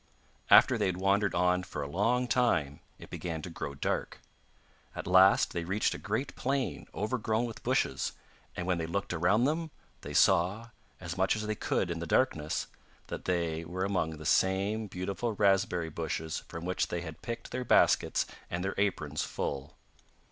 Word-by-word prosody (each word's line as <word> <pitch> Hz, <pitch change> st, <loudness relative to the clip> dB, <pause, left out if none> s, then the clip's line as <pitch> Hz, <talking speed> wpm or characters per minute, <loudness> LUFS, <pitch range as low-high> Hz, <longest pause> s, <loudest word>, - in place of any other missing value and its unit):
After -, -, +7 dB
they -, -, +2 dB
had 90 Hz, -1 st, -1 dB
wandered 100 Hz, +2 st, +2 dB
on 90 Hz, +1 st, +3 dB
for 90 Hz, -4 st, -5 dB
a -, -, -4 dB
long 115 Hz, -, +1 dB
time 80 Hz, -, +1 dB, 0.2 s
it -, -, -13 dB
began 80 Hz, -3 st, -4 dB
to 90 Hz, -, -6 dB
grow 70 Hz, -3 st, -5 dB
dark. 70 Hz, -, -2 dB, 0.8 s
At -, -, -5 dB
last 95 Hz, +2 st, +5 dB
they 85 Hz, -, -2 dB
reached 95 Hz, +5 st, 0 dB
a -, -, -6 dB
great 110 Hz, +6 st, -3 dB
plain 135 Hz, 0 st, -2 dB
overgrown 110 Hz, +1 st, -1 dB
with 115 Hz, -2 st, -7 dB
bushes, -, -, 0 dB, 0.4 s
and 90 Hz, -, -3 dB
when 90 Hz, -2 st, 0 dB
they 80 Hz, -, -2 dB
looked 100 Hz, +2 st, -2 dB
around 95 Hz, +7 st, +3 dB
them, 160 Hz, +4 st, 0 dB, 0.3 s
they -, -, -7 dB
saw, 100 Hz, +7 st, +3 dB, 0.3 s
as 90 Hz, 0 st, -6 dB
much 95 Hz, +3 st, +3 dB
as 110 Hz, 0 st, -3 dB
they 110 Hz, -, -1 dB
could 95 Hz, -3 st, -1 dB
in 85 Hz, -, -3 dB
the 85 Hz, -, -5 dB
darkness, 80 Hz, -, +1 dB, 0.4 s
that -, -, -6 dB
they 85 Hz, -3 st, -1 dB
were 90 Hz, +3 st, -3 dB
among 85 Hz, -5 st, -1 dB
the 80 Hz, -, -10 dB
same 100 Hz, +6 st, +2 dB
beautiful 100 Hz, +5 st, -3 dB
raspberry 95 Hz, -5 st, +2 dB
bushes 80 Hz, 0 st, -3 dB
from 85 Hz, +1 st, -7 dB
which 90 Hz, +1 st, 0 dB
they 85 Hz, -, -3 dB
had 80 Hz, -3 st, -8 dB
picked 115 Hz, -1 st, -6 dB
their 125 Hz, 0 st, -2 dB
baskets -, -, +3 dB, 0.2 s
and 85 Hz, +1 st, -3 dB
their 95 Hz, -, -1 dB
aprons 75 Hz, -7 st, 0 dB
full. 70 Hz, 0 st, -4 dB
95 Hz, 175 wpm, -30 LUFS, 85-105 Hz, 0.8 s, After